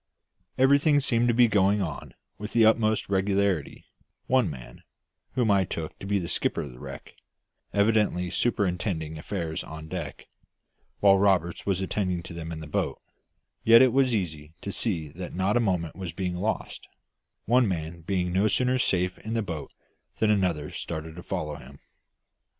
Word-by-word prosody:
Everything 140 +3 +5
seemed 120 -3 +2
to - - +4
be 120 0 +6
going 100 -1 +3
on 80 -7 -5 0.2
with 105 +1 -6
the 115 -2 +5
utmost 110 -1 +3
regularity 95 -3 0 0.4
one 130 -7 +2
man, 65 -5 -10 0.5
whom 120 -4 +2
I 100 -1 +4
took 80 -3 -6
to 95 - -7
be 100 0 +2
the 90 -3 -3
skipper 85 - 0
of 70 - -8
the - - -14
wreck, - - -9 0.6
evidently 100 -4 +2
superintending 90 -7 -1
affairs 85 -2 -3
on 80 0 -9
deck, - - -6 0.7
while 100 -1 +6
Roberts 95 -4 +1
was 95 -1 +1
attending 90 -3 -1
them 85 -1 -7
in 80 -1 -6
the - - -7
boat 75 - -2 0.6
yet 115 +2 +8
it 130 -3 +3
was 135 -1 +3
easy 80 -5 -4
to 100 - -4
see 90 -8 -1
that 90 +4 -8
not 95 +3 +1
a - - +4
moment 90 -7 -1
was 90 -4 -6
being 90 0 -3
lost, 105 +5 -3 0.6
one 120 +1 +4
man 85 -2 -4
being 90 0 -1
no 100 +3 +3
sooner 125 +4 +2
safe 90 -5 0
in 110 +1 -4
the 115 - 0
boat 80 -6 -6 0.5
than 110 -1 +3
another 90 -7 0
started 80 -1 -6
to 90 - -8
follow 80 -6 -4
him. 70 0 -13
95 Hz, 165 wpm, -27 LUFS, 85-110 Hz, 0.7 s, yet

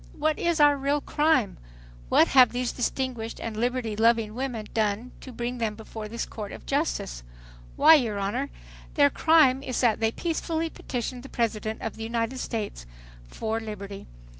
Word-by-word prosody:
"What 310 0 0
is 340 -1 +1
our 290 -1 +6
real 280 +2 +1
crime? 295 - +1 0.5
What - - +5
have 255 -2 +7
these 245 0 -1
distinguished 245 -2 -3
and 225 -1 -5
liberty 240 -1 -1
loving 225 -1 +3
women 245 -3 -4
done 220 +2 0
to 260 - -9
bring 240 +1 -4
them 220 -2 -1
before 220 0 -8
this 230 +2 -4
court 210 -3 -7
of - - -10
justice? - - -1 0.5
Why, - - +8
your 235 -9 +3
Honor, 225 +8 -2 0.5
their 285 -1 +5
crime 300 -5 +4
is 255 -3 -3
that 235 -4 +3
they 225 0 +2
peacefully 325 +1 -2
petitioned 245 0 -5
the 270 - -11
President 220 -2 -2
of 225 - -4
the 225 - -6
United 230 +2 -2
States 210 - -4 0.4
for 220 - -2
liberty. 200 -3 -7
235 Hz, 165 wpm, -26 LUFS, 220-270 Hz, 0.5 s, Why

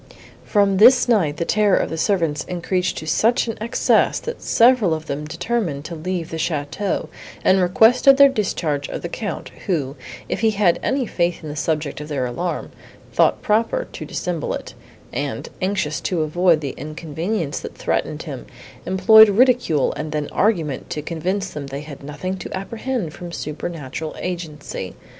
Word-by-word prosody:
From 200 -2 +2
this 245 +5 +7
night 175 -11 +2
the 170 - -1
terror 210 0 +3
of - - -1
the - - -2
servants 165 -6 +1
increased 180 +1 -1
to - - -5
such 225 +10 +2
an 225 - -3
excess, 230 +2 +2
that 470 - -6
several 230 -8 +4
of 155 0 -7
them 150 0 -4
determined 170 -2 -2
to 170 - -6
leave 170 +1 -4
the 165 - -3
château, 160 +4 -2 0.4
and 190 0 +5
requested 235 +9 +5
their 280 0 +9
discharge 170 - -1
of - - -5
the 170 - -3
Count, 205 +3 -5 0.2
who, 145 -7 -1 0.3
if - - -2
he 225 - +3
had 200 -5 +2
any 265 -1 0
faith 175 -5 -1
in 155 - -6
the 145 - -6
subject 150 -1 -2
of 150 - -7
their 140 -4 -1
alarm, 150 +9 -3 0.4
thought - - +3
proper 230 - +1
to - - -7
dissemble - - -3
it, - - -8 0.4
and, - - -3
anxious 185 -5 -1
to 170 -4 0
avoid 165 +1 +3
the 140 -3 -4
inconvenience 160 +2 -3
that - - -9
threatened - - -2
him, - - -7 0.4
employed 210 +4 +7
ridicule 235 - +3
and 150 0 -5
then 150 -1 -2
argument 165 - 0
to 150 - -4
convince 185 +5 -2
them 145 -2 -6
they 140 +1 -5
had 145 -2 -10
nothing 150 +7 -4
to 190 - -8
apprehend 220 -3 -4
from 175 -1 -8
supernatural 155 -1 -5
agency. 155 - -5
175 Hz, 170 wpm, -21 LUFS, 150-210 Hz, 0.4 s, their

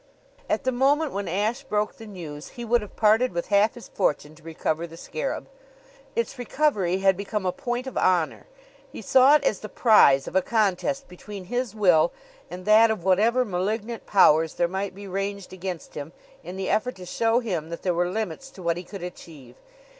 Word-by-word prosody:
At - - 0
the 260 - +1
moment 280 +4 +2
when 200 -1 -4
Ashe 210 +9 -1
broke 210 -6 -2
the 225 - -11
news 160 -7 -8
he 240 - -5
would 235 +1 +2
have 210 - -10
parted 220 +3 +3
with 170 0 -3
half 205 +2 +3
his 240 - -11
fortune 150 -5 -1
to 155 - -19
recover 160 +1 -3
the 165 0 -12
scarab. - - -4 0.7
Its 465 - -2
recovery 235 - +1
had 190 -1 +5
become 200 +1 -4
a 180 - +2
point 245 +1 -4
of 265 - -7
honor. 175 -4 +1 0.4
He - - -9
saw 265 +3 +6
it 300 - +2
as 200 - +1
the 215 - -8
prize 140 - +5
of - - -7
a 190 - +5
contest 225 +7 0
between 195 +2 -9
his 245 +3 -3
will 175 -6 +4 0.4
and 180 +2 -8
that 220 +2 +6
of 220 -6 -2
whatever 220 +7 +3
malignant 215 +4 -3
powers 160 -5 +4
there 175 - +1
might 190 +1 -4
be 200 +1 -9
ranged 195 0 -4
against 185 -2 -6
him 145 +3 -7 0.3
in 180 +3 -8
the 190 - -3
effort 250 +4 0
to 185 - -10
show 225 +5 +1
him 180 -10 -3
that 170 - -7
there 180 - +1
were 175 +1 0
limits 220 +5 -4
to 190 -8 -12
what 170 0 0
he 175 - -6
could 195 0 -9
achieve. 155 -8 -10
200 Hz, 200 wpm, -25 LUFS, 175-230 Hz, 0.7 s, saw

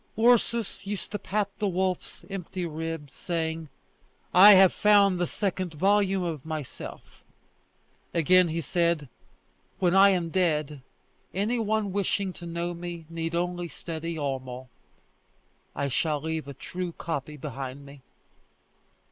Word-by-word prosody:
Ursus 230 -3 +2
used 205 -1 -4
to 210 - -3
pat 205 +1 -1
the 210 - +1
wolf's 185 -1 -2
empty 185 -1 -5
ribs, 160 -2 -5
saying: 160 -2 -3 0.6
"I 200 +4 +10
have 190 -1 +7
found 200 -3 +4
the 175 - +1
second 185 -4 -2
volume 195 +2 +2
of 160 -6 -3
myself!" 155 -4 -7 0.9
Again 180 +2 +4
he 165 +1 -2
said, 170 -2 0 0.7
"When 180 -2 +2
I 195 +1 +8
am 180 -3 +1
dead, 155 -5 0 0.5
any 215 +5 0
one 215 -2 0
wishing 200 -1 0
to 175 - -9
know 170 +1 -3
me 170 -1 -7
need 165 0 -3
only 175 0 -1
study 165 0 -5
Homo. 130 -3 -4 1.1
I 140 - -1
shall 150 +3 0
leave 160 0 -3
a 140 - -8
true 180 +5 -5
copy 150 -2 -4
behind 135 -1 -6
me." 140 0 -13
170 Hz, 130 wpm, -27 LUFS, 155-195 Hz, 1.1 s, I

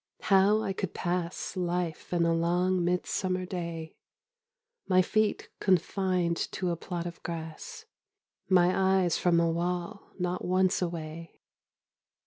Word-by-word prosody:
How 200 +2 +4
I 195 - -1
could 190 -2 -4
pass 175 +1 -2
Life 175 -3 -2
in 170 -1 +2
a 165 - +3
long 175 +2 +1
midsummer 185 +1 -1
day, 170 -3 -5 0.9
My 185 0 +5
feet 215 +3 0
confined 185 -2 +1 0.2
to 180 -2 -1
a - - 0
plot 170 +1 -5
of 170 -1 -7
grass, 165 - -7 0.6
My 190 +1 +4
eyes 175 -2 +1
from 175 -2 +3
a 170 -1 +2
wall 175 +4 -3
not 180 -1 -2
once 185 +1 +2
away! 165 -1 -5
180 Hz, 125 wpm, -29 LUFS, 170-185 Hz, 0.9 s, My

